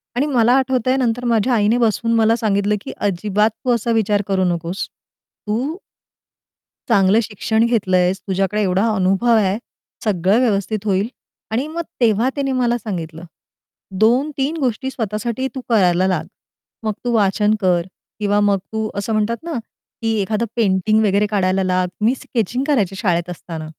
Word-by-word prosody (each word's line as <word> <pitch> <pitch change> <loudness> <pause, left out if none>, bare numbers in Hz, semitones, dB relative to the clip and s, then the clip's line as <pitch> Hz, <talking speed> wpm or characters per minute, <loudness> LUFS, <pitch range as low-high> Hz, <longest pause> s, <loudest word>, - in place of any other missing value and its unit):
आणि 275 +4 +1
मला 245 -3 +3
आठवतंय 255 -1 +1
नंतर 245 -1 0
माझ्या 235 +1 +2
आईने 220 +2 +3
बसवून 230 0 +1
मला 225 0 +4
सांगितलं 210 -2 +1
की - - -7
"अजिबात 205 +2 +1 0.2
तू 250 - +2
असा 230 +1 -1
विचार 210 -2 +2
करू 190 -1 +1
नकोस. 175 +2 -2 0.6
तू" 260 - -1 1.1
"चांगलं 200 0 +4
शिक्षण 220 +2 0
घेतलं 205 -6 +1
आहेस, 180 +1 +1
तुझ्याकडे 195 +2 0
एवढा 195 +3 +1
अनुभव 195 +5 +2
आहे, 200 -1 +2 0.5
सगळं 200 +1 +2
व्यवस्थित 215 -2 0
होईल." 195 +1 +1 0.4
आणि 255 +7 -1
मग 335 +2 -4 0.2
तेव्हा 230 +2 +3
तिने 275 -1 -1
मला 245 -2 +1
सांगितलं, 170 -7 -6 0.8
"2-3 275 +6 +2
गोष्टी 265 -1 -1
स्वतःसाठी 230 +3 -3
तू 260 - -4
करायला 185 -4 +3
लाग. 170 -4 -1 0.6
मग 215 -1 -1
तू 240 - +1
वाचन 210 +1 +2
कर 180 -2 +3 0.4
किंवा 205 0 +1
मग 205 -1 +3 0.2
तू 220 0 -1
असं 200 +2 -2
म्हणतात 215 +2 0
ना, 335 - -5 0.5
की 225 0 0
एखादं 215 +3 -1
पेंटिंग 215 0 +2
वगैरे 200 +1 +2
काढायला 190 -2 +1
लाग." 185 0 +1 0.2
मी 250 +4 +3
स्केचिंग 245 +1 -2
करायची 205 -10 +1
शाळेत 180 -4 0
असताना. 160 -2 -7
215 Hz, 155 wpm, -19 LUFS, 195-235 Hz, 1.1 s, मला